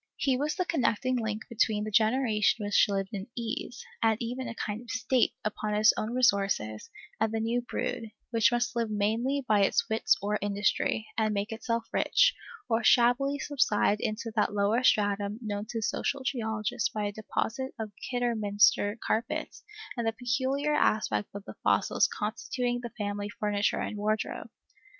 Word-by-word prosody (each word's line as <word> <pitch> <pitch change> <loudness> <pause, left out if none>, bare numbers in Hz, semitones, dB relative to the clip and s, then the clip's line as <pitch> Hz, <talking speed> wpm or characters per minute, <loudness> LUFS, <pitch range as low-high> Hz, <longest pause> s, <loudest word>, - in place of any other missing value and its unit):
He 270 -2 +1
was 295 +4 -1
the 365 - -1
connecting 255 - +1
link 220 -2 -3
between 215 -3 +1
the 215 - -4
generation 220 -1 +2
which 205 - +4
lived 195 0 -2
in 195 0 -5
ease, 235 +2 -4 0.2
and 225 -1 +3
even 250 +2 -4
a 230 - -6
kind 210 +1 -4
of 240 - -14
state, 250 0 +1
upon 215 0 -2
its 215 +2 +5
own 225 +3 -3
resources, 195 - +1 0.3
and 220 -1 +1
the 225 - -1
new 230 +2 0
brood, 225 -1 -4 0.2
which 225 -3 +4
must 240 0 0
live 230 -2 0
mainly 230 +7 0
by 210 -2 +4
its 195 - +2
wits 220 - +3
or 210 +2 -1
industry, 205 +2 0
and 215 -1 +1
make 205 +3 -2
itself 230 0 -2
rich, - - +4 0.3
or 230 -1 +1
shabbily 255 +3 +4
subside 235 -7 +1
into 225 +1 -3
that 210 -1 +1
lower 205 +5 +2
stratum 205 -2 +2
known 210 -2 -4
to 225 -2 -3
social 275 +5 -1
geologists 220 -5 -1
by 210 -1 -3
a 205 - -1
deposit 220 +4 -3
of 215 -2 -4 0.2
Kidderminster 215 -4 +2
carpets 225 +2 -2 0.3
and 235 -3 -2
the 225 - +1
peculiar 260 +5 0
aspect 160 - +1
of 200 0 -7
the - - -10
fossils - - +3
constituting 245 +3 -2
the 240 - -5
family 205 -1 -3
furniture 205 0 0
and 210 - -3
wardrobe. 215 +1 -2
220 Hz, 165 wpm, -29 LUFS, 210-245 Hz, 0.3 s, its